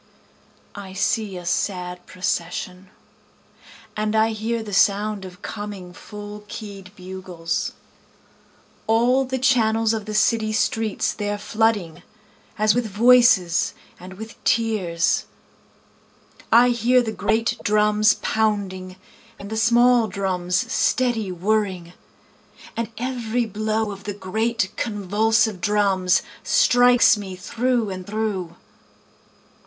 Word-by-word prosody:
I 195 Hz, -2 st, -9 dB
see 205 Hz, 0 st, -1 dB
a 175 Hz, -, -9 dB
sad 180 Hz, 0 st, -2 dB
procession, 180 Hz, 0 st, -4 dB, 1.1 s
And 215 Hz, 0 st, -1 dB
I 220 Hz, +1 st, +3 dB
hear 225 Hz, +1 st, -3 dB
the 205 Hz, -2 st, -8 dB
sound 200 Hz, +1 st, +2 dB
of 180 Hz, -1 st, -12 dB
coming 205 Hz, -4 st, -7 dB
full 210 Hz, +1 st, -9 dB
keyâd 200 Hz, -3 st, -9 dB
bugles, 185 Hz, -3 st, -4 dB, 1.1 s
All 245 Hz, +4 st, +3 dB
the 260 Hz, 0 st, -3 dB
channels 225 Hz, -4 st, +2 dB
of 220 Hz, -2 st, -3 dB
the 215 Hz, -, -4 dB
city 215 Hz, 0 st, +2 dB
streets 220 Hz, 0 st, 0 dB
theyâre 205 Hz, -1 st, -3 dB
flooding, 215 Hz, -6 st, 0 dB, 0.6 s
As 215 Hz, 0 st, +3 dB
with 245 Hz, -2 st, 0 dB
voices 220 Hz, -5 st, +4 dB, 0.2 s
and 185 Hz, +1 st, -10 dB
with 220 Hz, +4 st, -11 dB
tears. 195 Hz, -8 st, +1 dB, 1.3 s
I 240 Hz, +2 st, +6 dB
hear 245 Hz, +1 st, +3 dB
the 220 Hz, -, -3 dB
great 220 Hz, +3 st, 0 dB
drums 210 Hz, 0 st, +3 dB
pounding, 195 Hz, -4 st, -1 dB, 0.4 s
And 200 Hz, +1 st, -10 dB
the -, -, -2 dB
small 240 Hz, +1 st, +4 dB
drums 185 Hz, -2 st, -2 dB, 0.2 s
steady 235 Hz, -6 st, +1 dB
whirring, 185 Hz, -2 st, -1 dB, 0.8 s
And 230 Hz, -2 st, -3 dB
every 245 Hz, -1 st, -2 dB
blow 215 Hz, 0 st, -2 dB
of 200 Hz, 0 st, -10 dB
the 205 Hz, -1 st, -4 dB
great 210 Hz, +1 st, -1 dB
convulsive 215 Hz, 0 st, +1 dB
drums, 195 Hz, -2 st, +2 dB, 0.2 s
Strikes 245 Hz, -, +5 dB
me 195 Hz, -2 st, -7 dB
through 230 Hz, +3 st, -1 dB
and 185 Hz, -1 st, -7 dB
through. 205 Hz, -5 st, -3 dB
210 Hz, 110 wpm, -22 LUFS, 190-225 Hz, 1.3 s, I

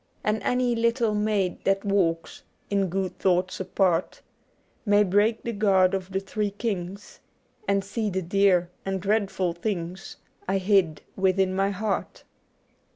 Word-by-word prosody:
* -, -, -38 dB
And 210 Hz, 0 st, 0 dB
any 250 Hz, +2 st, +1 dB
little 230 Hz, -1 st, +1 dB
maid 210 Hz, -3 st, 0 dB
that 195 Hz, +1 st, +1 dB
walks 175 Hz, -5 st, 0 dB, 0.3 s
In 200 Hz, -1 st, +2 dB
good 185 Hz, 0 st, -3 dB
thoughts 185 Hz, 0 st, +1 dB
apart. 185 Hz, -2 st, 0 dB, 0.6 s
May 205 Hz, -1 st, +4 dB
break 205 Hz, +4 st, +2 dB
the 235 Hz, -, -2 dB
guard 195 Hz, -3 st, +3 dB
of 190 Hz, -1 st, -3 dB
the 190 Hz, -, 0 dB
Three 205 Hz, +2 st, -2 dB
Kings, 200 Hz, -2 st, -5 dB, 0.5 s
And 200 Hz, 0 st, +2 dB
see 215 Hz, +1 st, -2 dB
the 190 Hz, -1 st, -2 dB
dear 180 Hz, -1 st, +2 dB
and 195 Hz, 0 st, -2 dB
dreadful 195 Hz, -3 st, 0 dB
things 180 Hz, 0 st, -5 dB, 0.3 s
I 195 Hz, +1 st, +1 dB
hid 190 Hz, -5 st, +2 dB
within 190 Hz, 0 st, +2 dB
my 195 Hz, +1 st, +1 dB
heart.' 200 Hz, +1 st, -3 dB
195 Hz, 145 wpm, -26 LUFS, 185-210 Hz, 0.6 s, May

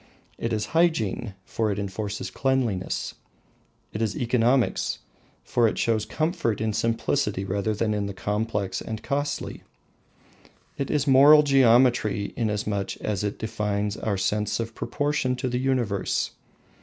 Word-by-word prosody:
It -, -, -2 dB
is 105 Hz, -1 st, 0 dB
hygiene, 125 Hz, -, +1 dB
for 110 Hz, -1 st, -1 dB
it 100 Hz, -, -2 dB
enforces 100 Hz, +1 st, -4 dB
cleanliness; 130 Hz, -8 st, -1 dB, 0.8 s
it 105 Hz, -, -3 dB
is 110 Hz, -3 st, -1 dB
economics, 120 Hz, +1 st, +1 dB, 0.5 s
for 120 Hz, -2 st, +2 dB
it -, -, -2 dB
shows 110 Hz, -2 st, +1 dB
comfort 155 Hz, -, -1 dB
in 110 Hz, 0 st, -1 dB
simplicity 115 Hz, -2 st, 0 dB
rather 100 Hz, +3 st, -1 dB
than 105 Hz, 0 st, 0 dB
in 105 Hz, -1 st, -1 dB
the 100 Hz, -, -5 dB
complex 105 Hz, -1 st, -2 dB
and 110 Hz, 0 st, -6 dB
costly; 145 Hz, +1 st, -2 dB, 1.1 s
it 140 Hz, -, -3 dB
is 145 Hz, -2 st, +1 dB
moral 145 Hz, +2 st, +8 dB
geometry, 120 Hz, -6 st, +3 dB
inasmuch 105 Hz, -3 st, -2 dB
as 105 Hz, -2 st, -2 dB
it 105 Hz, -1 st, -2 dB
defines 105 Hz, -2 st, -2 dB
our 105 Hz, -2 st, -2 dB
sense 105 Hz, +3 st, 0 dB
of 115 Hz, 0 st, -3 dB
proportion 145 Hz, -2 st, -1 dB
to 125 Hz, +1 st, -3 dB
the 125 Hz, 0 st, -1 dB
universe. 125 Hz, -7 st, 0 dB
110 Hz, 135 wpm, -25 LUFS, 105-130 Hz, 1.1 s, moral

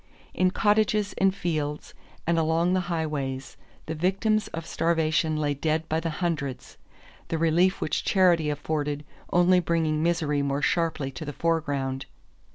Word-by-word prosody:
In 185 Hz, -, +3 dB
cottages 210 Hz, 0 st, +2 dB
and 195 Hz, 0 st, +4 dB
fields 150 Hz, -5 st, -3 dB, 0.3 s
and 165 Hz, 0 st, +2 dB
along 165 Hz, +3 st, +2 dB
the 185 Hz, -, +3 dB
highways 145 Hz, -5 st, -3 dB, 0.3 s
the 160 Hz, -, -3 dB
victims 195 Hz, +6 st, +1 dB
of 165 Hz, 0 st, -6 dB
starvation 160 Hz, -2 st, +1 dB
lay 145 Hz, -1 st, 0 dB
dead 155 Hz, +3 st, -1 dB
by 160 Hz, 0 st, 0 dB
the 165 Hz, 0 st, -2 dB
hundreds, 155 Hz, -5 st, -3 dB, 0.5 s
the 165 Hz, -, -1 dB
relief 170 Hz, +4 st, +3 dB
which -, -, -1 dB
charity 175 Hz, -5 st, +3 dB
afforded 150 Hz, 0 st, -2 dB, 0.3 s
only 180 Hz, +1 st, +5 dB
bringing 160 Hz, -3 st, 0 dB
misery 160 Hz, -4 st, +1 dB
more 140 Hz, +1 st, -1 dB
sharply 160 Hz, -5 st, 0 dB
to 130 Hz, +4 st, -7 dB
the 145 Hz, -1 st, -5 dB
foreground. 140 Hz, -5 st, -1 dB
160 Hz, 145 wpm, -26 LUFS, 150-175 Hz, 0.5 s, only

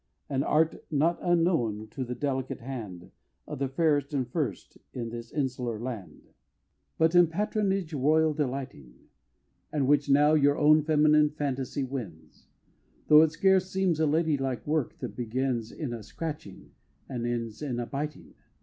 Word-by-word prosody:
An 135 Hz, -1 st, 0 dB
Art 160 Hz, +3 st, +1 dB
not 160 Hz, +3 st, +1 dB
unknown 165 Hz, -, +1 dB
to 135 Hz, -, -4 dB
the 125 Hz, 0 st, -5 dB
delicate 135 Hz, -2 st, -2 dB
hand 110 Hz, -9 st, -7 dB, 0.3 s
Of 150 Hz, -3 st, -7 dB
the 140 Hz, -, 0 dB
fairest 145 Hz, 0 st, +1 dB
and 130 Hz, -3 st, 0 dB
first 125 Hz, -, -4 dB, 0.2 s
in 115 Hz, -2 st, -4 dB
this 115 Hz, 0 st, -8 dB
insular 125 Hz, -6 st, -2 dB
land, 115 Hz, -5 st, -7 dB, 0.7 s
But 160 Hz, +1 st, +3 dB
in 175 Hz, -1 st, +6 dB
Patronage 195 Hz, -1 st, -1 dB
Royal 155 Hz, +3 st, +3 dB
delighting; 130 Hz, -, -4 dB, 0.8 s
And 145 Hz, -3 st, 0 dB
which 145 Hz, +1 st, +2 dB
now 145 Hz, +2 st, +5 dB
your 145 Hz, -2 st, +4 dB
own 155 Hz, +1 st, +5 dB
feminine 150 Hz, 0 st, +4 dB
fantasy 140 Hz, -2 st, -3 dB
wins, 100 Hz, -, -8 dB, 0.6 s
Tho' 150 Hz, 0 st, +9 dB
it 160 Hz, -1 st, +3 dB
scarce 190 Hz, +2 st, +3 dB
seems 185 Hz, -4 st, 0 dB
a 160 Hz, -, +3 dB
lady 155 Hz, -1 st, +1 dB
like 130 Hz, -2 st, -3 dB
work, 150 Hz, -3 st, -1 dB
that -, -, -5 dB
begins 120 Hz, -1 st, -2 dB
In 145 Hz, -7 st, -5 dB
a 115 Hz, -, -6 dB
scratching 145 Hz, -, -7 dB, 0.4 s
and 120 Hz, -3 st, -3 dB
ends 115 Hz, -1 st, -4 dB
in 130 Hz, -5 st, -3 dB
a 120 Hz, -, -2 dB
biting! 150 Hz, +4 st, -6 dB
140 Hz, 155 wpm, -28 LUFS, 125-155 Hz, 0.8 s, Tho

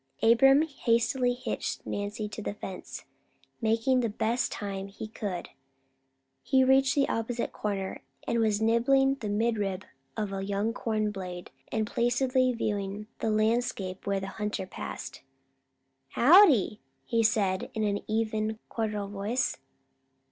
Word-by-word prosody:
Abram 270 Hz, +6 st, +6 dB
hastily 245 Hz, -3 st, +1 dB
hitched 250 Hz, -, -4 dB
Nancy 205 Hz, +1 st, -3 dB
to 215 Hz, -, -7 dB
the 205 Hz, -, -4 dB
fence. 190 Hz, -3 st, -7 dB, 0.6 s
By 225 Hz, -, 0 dB
making 230 Hz, +4 st, +3 dB
the 235 Hz, -2 st, 0 dB
best 225 Hz, +4 st, 0 dB
time 195 Hz, -2 st, -4 dB
he 200 Hz, +2 st, -8 dB
could, 205 Hz, -4 st, -5 dB, 0.9 s
he 265 Hz, -1 st, +3 dB
reached 265 Hz, 0 st, +4 dB
the 280 Hz, -1 st, +3 dB
opposite 230 Hz, +1 st, -2 dB
corner, 195 Hz, -2 st, -3 dB, 0.3 s
and 235 Hz, -, +1 dB
was 215 Hz, -2 st, +2 dB
nibbling 245 Hz, +5 st, +3 dB
the 215 Hz, -, -4 dB
midrib 205 Hz, -3 st, 0 dB, 0.3 s
of 210 Hz, -2 st, -2 dB
a 195 Hz, 0 st, -3 dB
young 200 Hz, +3 st, -1 dB
corn 215 Hz, -3 st, -1 dB
blade 180 Hz, -3 st, -7 dB, 0.2 s
and 220 Hz, -1 st, 0 dB
placidly 255 Hz, +3 st, +2 dB
viewing 210 Hz, -2 st, -3 dB
the 225 Hz, -, 0 dB
landscape 215 Hz, -4 st, 0 dB
when 200 Hz, -1 st, 0 dB
the 195 Hz, -, -4 dB
hunter 210 Hz, -1 st, -3 dB
passed. -, -, -7 dB, 0.9 s
"Howdy!" 275 Hz, -, +6 dB, 0.2 s
he 230 Hz, -1 st, +1 dB
said 210 Hz, 0 st, +1 dB
in 220 Hz, -, 0 dB
an 205 Hz, -1 st, 0 dB
even 220 Hz, 0 st, -1 dB
cordial 210 Hz, -3 st, -2 dB
voice. 205 Hz, +6 st, -1 dB
220 Hz, 135 wpm, -28 LUFS, 205-240 Hz, 0.9 s, Abram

